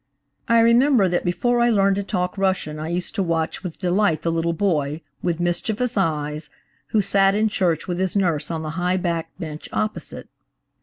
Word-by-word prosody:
I 230 0 +5
remember 235 -1 +5
that 175 -1 0
before 240 +7 +1
I 240 0 +4
learned 200 -3 +3
to 200 - -1
talk 180 -3 -2
Russian 185 -6 -1
I 155 - -4
used 175 +4 -3
to 215 - -1
watch 165 -3 -1
with 180 -4 -6
delight 180 -2 +1
the 165 - +1
little 165 0 0
boy, 160 -4 0 0.2
with 175 -2 -1
mischievous 215 +8 -1
eyes, 155 -5 -1 0.4
who 215 -2 +1
sat 195 +1 +3
in 215 +1 +2
church 175 -6 0
with 175 -1 -2
his 190 0 -1
nurse 175 -7 +1
on 160 -1 -3
the 155 - -4
high 180 +1 +1
backed 170 -3 -3
bench 155 -2 -7
opposite. 215 0 -3
180 Hz, 190 wpm, -22 LUFS, 165-205 Hz, 0.4 s, I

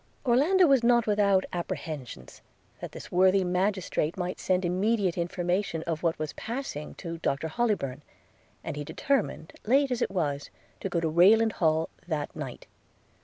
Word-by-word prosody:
Orlando 300 +10 +4
was 270 -6 +4
not 235 -1 +4
without 200 -2 +3
apprehensions, 150 - -6 0.4
that - - -7
this - - -10
worthy 190 +2 +4
magistrate 180 -2 0
might 180 0 -3
send 185 0 +1
immediate 190 +1 +1
information 175 0 -1
of 165 -2 -3
what 165 -2 0
was 155 -1 -4
passing 230 - -5
to 170 -2 -6
Dr 140 -1 -1
Hollybourn; 155 - -1 0.6
and - - -4
he 145 - -4
determined, 265 - -1
late 270 +4 +3
as 245 - -1
it - - +1
was, 145 -7 -2 0.3
to 195 - -3
go 175 - 0
to 165 - 0
Rayland 205 +8 +5
Hall 160 -3 +1 0.2
that 150 -4 -3
night. 135 -5 -7
180 Hz, 155 wpm, -28 LUFS, 160-215 Hz, 0.6 s, Rayland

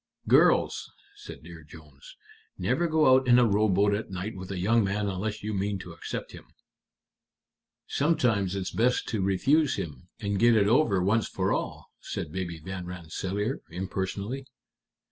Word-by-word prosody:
"Girls," - - +3 0.2
said 420 0 -11
Dear - - -11
Jones, - - -15 0.4
"never 175 - 0
go 155 -4 +4
out 130 0 +3
in 120 0 +6
a 125 - +6
rowboat 100 -1 +3
at 105 +2 -3
night 95 +4 -5
with 95 -1 -8
a 100 - -4
young 110 +5 +3
man 100 +1 -1
unless 105 +3 -3
you 105 +1 -3
mean 100 0 -1
to 90 -2 -9
accept 85 - -6
him." - - -12 1.4
"Sometimes 115 - +1
it's 95 -1 -3
best 125 +2 +1
to 110 -4 -1
refuse 130 - +2
him, 85 +2 -6
and 100 -2 -2
get 120 0 +5
it 100 -2 +4
over 105 -6 +3
once 110 +3 +2
for - - -1
all," - - -4
said - - -5
Baby 85 -1 -4
Van 90 +2 -6
Rensselaer, 95 - -4
impersonally. 95 +8 -4
100 Hz, 160 wpm, -27 LUFS, 95-120 Hz, 1.4 s, in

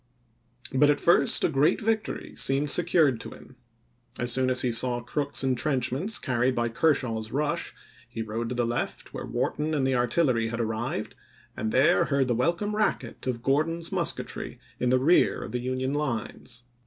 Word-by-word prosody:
But 145 +2 +4
at 145 - +2
first 170 - +5
a - - +5
great 145 -1 +2
victory 220 0 -2
seemed 135 +1 +1
secured 160 -8 +3
to - - -7
him. 130 - -14 0.6
As 120 0 -1
soon 130 +1 +2
as 130 -1 +1
he 125 - +1
saw 120 +1 +2
Crook's 140 +3 -2
intrenchments 135 - 0
carried 125 -1 0
by 120 0 0
Kershaw's 115 -5 0
rush, 145 +2 -2 0.3
he 115 - -5
rode 115 +2 -4
to 125 - -3
the 120 0 +1
left, 120 +1 -4
where - - -6
Wharton 155 +1 -1
and 135 -3 +1
the 135 - +1
artillery 125 -1 +1
had 115 +1 -4
arrived, 110 +1 -3 0.4
and 110 - -3
there 130 +3 +4
heard 140 -2 +1
the 120 - +1
welcome 170 - 0
racket 215 - -2
of 120 -2 -3
Gordon's 165 +5 0
mus - - +1
ketry - - -7 0.2
in 125 - +1
the 130 - +4
rear 150 +8 +3
of - - -7
the 125 - -2
Union 130 +2 -2
lines. 120 -4 -3
130 Hz, 180 wpm, -26 LUFS, 120-150 Hz, 0.6 s, first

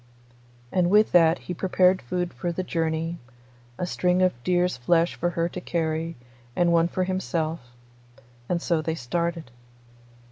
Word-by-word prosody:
And 180 -1 +2
with 210 +2 +4
that 165 -1 +5
he 180 - -6
prepared 185 +1 +2
food 175 +7 -3
for 175 - -3
the 185 +2 -3
journey, 165 0 -2 0.6
a - - -2
string 180 +1 +1
of 185 - +3
deer's 180 0 +1
flesh 165 +7 +2
for 175 - -1
her 170 -1 -1
to 180 - -7
carry, 165 -1 -2 0.4
and 175 -1 +3
one 165 0 +4
for 185 +1 -1
himself; 170 -3 -2 0.9
and 170 -1 -1
so 165 -2 +1
they 160 +1 -2
started. 165 +2 -3
170 Hz, 150 wpm, -25 LUFS, 165-180 Hz, 0.9 s, that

